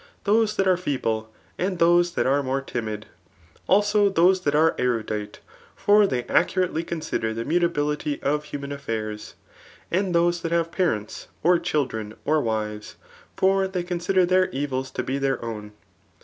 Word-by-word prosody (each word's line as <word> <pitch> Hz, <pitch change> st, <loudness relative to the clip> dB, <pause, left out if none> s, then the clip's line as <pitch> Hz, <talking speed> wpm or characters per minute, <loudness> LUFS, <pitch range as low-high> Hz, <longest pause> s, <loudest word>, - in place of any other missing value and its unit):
Those 215 Hz, +1 st, +2 dB
that 195 Hz, -2 st, +1 dB
are 185 Hz, -1 st, +4 dB
feeble, 115 Hz, -10 st, -2 dB, 0.3 s
and 185 Hz, 0 st, -1 dB
those 175 Hz, +1 st, +4 dB
that -, -, 0 dB
are 140 Hz, +2 st, +3 dB
more 135 Hz, 0 st, -1 dB
timid. 110 Hz, -5 st, -5 dB, 0.6 s
Also 205 Hz, +1 st, +4 dB
those 185 Hz, 0 st, +4 dB
that 145 Hz, -4 st, 0 dB
are 160 Hz, +2 st, +4 dB
erudite; 110 Hz, -4 st, -2 dB, 0.3 s
for 205 Hz, 0 st, +4 dB
they 125 Hz, -8 st, -1 dB
accurately 180 Hz, 0 st, +1 dB
consider 155 Hz, -10 st, -3 dB
the 115 Hz, +1 st, -3 dB
mutability 150 Hz, -3 st, 0 dB
of 150 Hz, +1 st, 0 dB
human 140 Hz, -1 st, -6 dB
affairs. 110 Hz, -6 st, -5 dB, 0.6 s
And 185 Hz, 0 st, 0 dB
those 175 Hz, 0 st, +2 dB
^hat 165 Hz, -, -2 dB
have 165 Hz, 0 st, 0 dB
parents, 110 Hz, -, -2 dB, 0.2 s
or 175 Hz, +1 st, +4 dB
chil 155 Hz, -4 st, 0 dB
dren, 110 Hz, -3 st, -7 dB
or 155 Hz, 0 st, +2 dB
wives; 105 Hz, -2 st, -3 dB, 0.4 s
for 195 Hz, 0 st, +3 dB
they 185 Hz, -2 st, -3 dB
consider 180 Hz, +1 st, +1 dB
their 185 Hz, +1 st, +3 dB
evils 135 Hz, -1 st, -3 dB
to -, -, -4 dB
be 135 Hz, +2 st, -2 dB
their 135 Hz, -2 st, 0 dB
own. 105 Hz, -2 st, -6 dB
155 Hz, 160 wpm, -24 LUFS, 125-180 Hz, 0.6 s, are